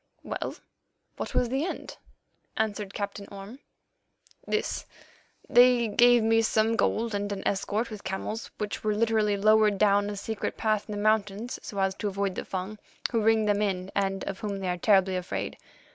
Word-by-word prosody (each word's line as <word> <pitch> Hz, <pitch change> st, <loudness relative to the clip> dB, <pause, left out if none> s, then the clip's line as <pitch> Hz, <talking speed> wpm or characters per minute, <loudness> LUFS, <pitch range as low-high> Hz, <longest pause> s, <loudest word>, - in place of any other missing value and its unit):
'" -, -, -43 dB
"Well, -, -, -4 dB, 0.6 s
what -, -, -5 dB
was 245 Hz, -, +2 dB
the 270 Hz, +4 st, 0 dB
end?" 365 Hz, -, -5 dB, 0.6 s
asked 210 Hz, -2 st, -1 dB
Captain 200 Hz, 0 st, -5 dB
Orme. 200 Hz, +6 st, -9 dB, 0.9 s
"This: -, -, -2 dB, 0.6 s
They 245 Hz, -2 st, +5 dB
gave 240 Hz, +2 st, +5 dB
me 225 Hz, 0 st, +4 dB
some 220 Hz, 0 st, +2 dB
gold 225 Hz, 0 st, 0 dB
and 205 Hz, 0 st, -2 dB
an 200 Hz, -, -3 dB
escort 210 Hz, +4 st, -1 dB
with 210 Hz, -2 st, -8 dB
camels 190 Hz, +4 st, -4 dB
which 210 Hz, -1 st, -4 dB
were 215 Hz, -1 st, +1 dB
literally 215 Hz, -2 st, +2 dB
lowered 215 Hz, 0 st, +4 dB
down 205 Hz, 0 st, +3 dB
a 205 Hz, -, -4 dB
secret 215 Hz, +1 st, -4 dB
path 215 Hz, -2 st, 0 dB
in -, -, -3 dB
the -, -, -4 dB
mountains 215 Hz, +2 st, 0 dB
so 200 Hz, -, -8 dB
as 195 Hz, -1 st, +1 dB
to 210 Hz, -, -2 dB
avoid 200 Hz, -1 st, -1 dB
the -, -, -5 dB
Fung, 190 Hz, +3 st, -5 dB, 0.3 s
who 230 Hz, -3 st, +1 dB
ring 220 Hz, 0 st, +3 dB
them 205 Hz, 0 st, +2 dB
in 190 Hz, -2 st, -1 dB
and 195 Hz, -1 st, 0 dB
of 195 Hz, -, -5 dB
whom 205 Hz, -2 st, -3 dB
they 190 Hz, -2 st, -3 dB
are 180 Hz, -, -1 dB
terribly 190 Hz, 0 st, +3 dB
afraid. 180 Hz, 0 st, -3 dB
210 Hz, 180 wpm, -27 LUFS, 195-220 Hz, 0.9 s, They